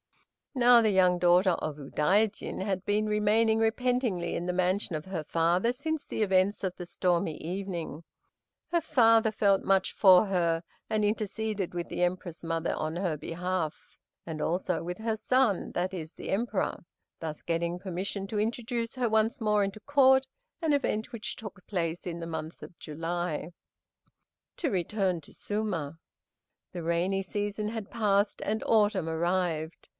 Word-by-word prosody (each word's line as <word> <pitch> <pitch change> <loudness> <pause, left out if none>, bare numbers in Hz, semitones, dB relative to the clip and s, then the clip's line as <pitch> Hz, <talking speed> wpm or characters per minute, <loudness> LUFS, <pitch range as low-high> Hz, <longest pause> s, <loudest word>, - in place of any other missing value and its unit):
Now 245 -2 +6
the 220 - +3
young 185 -2 +4
daughter 180 +2 +5
of 155 -3 -3
Udaijin 190 +9 0
had 190 -2 -2
been 210 +1 +1
remaining 215 +1 +3
repentingly 225 -5 0
in 175 - -3
the - - +1
mansion 185 0 0
of 150 - -9
her 185 -5 -4
father 170 +8 +2
since 295 +4 -3
the 220 - -1
events 190 +1 +2
of 185 -2 -2
the 175 - -7
stormy 175 -3 0
evening. 175 -3 -5 0.7
Her 340 -1 +2
father 225 -7 +4
felt 200 -2 +2
much 195 -1 +2
for 190 0 +7
her, 170 -4 +1 0.3
and 215 -1 +1
interceded 210 -2 -2
with 175 -1 -3
the - - -2
Empress 175 -1 -2
mother 165 0 -1
in 155 +2 -2
her 175 -4 0
behalf, 170 +1 -4 0.3
and 160 -2 -5
also 175 0 -1
with 180 +1 -4
her 220 0 -1
son, 235 -3 +1
that 185 +2 -1
is, 160 -3 -6
the - - -7
Emperor, 210 0 -1 0.4
thus 155 -2 -6
getting 170 +1 -1
permission 195 +2 -4
to 210 +1 -2
introduce 230 +2 -2
her 250 -2 +1
once 220 0 +2
more 210 -2 +2
into 195 +1 -3
Court, 265 0 +4 0.4
an 320 -3 +2
event 230 -6 -1
which 225 -2 -5
took 200 -3 -10
place 170 -3 -2
in 170 -1 -4
the 165 - -5
month 160 0 -6
of 170 - -11
July. 165 +1 -3 1.0
To 315 - 0
return 185 -2 0
to - - -16
Suma. 175 -8 -3 0.7
The 175 -2 -5
rainy 175 +4 +1
season 205 +2 -3
had 220 -2 -6
passed, 205 -2 +1
and 220 +1 -1
autumn 205 -6 +3
arrived. 165 -1 -1
190 Hz, 160 wpm, -29 LUFS, 170-220 Hz, 1.0 s, for